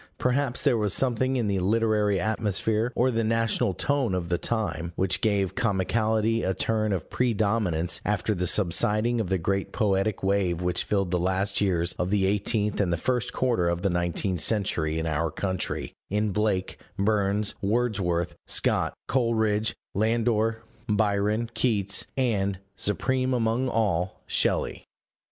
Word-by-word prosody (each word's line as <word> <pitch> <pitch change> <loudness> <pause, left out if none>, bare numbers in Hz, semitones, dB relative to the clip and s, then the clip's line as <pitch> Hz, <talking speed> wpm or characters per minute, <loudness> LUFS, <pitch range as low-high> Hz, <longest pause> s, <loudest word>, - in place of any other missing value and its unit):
Perhaps 130 0 0
there 125 -6 +3
was 105 -3 +1
something 130 0 +1
in 120 - 0
the 100 -2 0
literary 105 0 +2
atmosphere 110 +2 0
or 130 +2 +2
the 115 -1 0
national 115 -2 +1
tone 135 -9 0
of 85 -2 -3
the 90 - +1
time 85 -7 -2
which 95 0 0
gave 100 -4 +1
comicality 110 +1 +1
a 95 - -1
turn 110 -1 0
of 95 -4 -2
predominance 100 -7 0
after 105 +1 0
the 90 -2 -1
subsiding 105 +6 +2
of 95 - -4
the 95 - +1
great 95 +3 -2
poetic 100 -2 0
wave 95 -3 +1
which 90 0 -1
filled 100 -4 0
the 90 - +1
last 95 +3 0
years 90 -3 +1
of 90 - 0
the 100 -1 +2
eighteenth 105 +2 0
and 90 -3 0
the 85 - +1
first 125 +7 -1
quarter 120 -9 +1
of 85 0 -2
the 100 - +2
nineteenth 90 +1 -1
century 85 -7 0
in 80 - -2
our 80 +1 0
country, 95 +3 -3 0.2
in 105 +1 0
Blake, 105 -2 -1 0.2
Burns, 100 0 +1
Wordsworth, 100 -6 0
Scott, - - +1
Coleridge, 110 -4 +1 0.2
Landor, 115 +1 +1 0.3
Byron, 105 +1 +1
Keats, 100 -6 +1
and, 100 -7 0 0.2
supreme 130 +6 0
among 120 +2 0
all, 95 -6 0
Shelley. - - 0
105 Hz, 150 wpm, -26 LUFS, 95-115 Hz, 0.3 s, there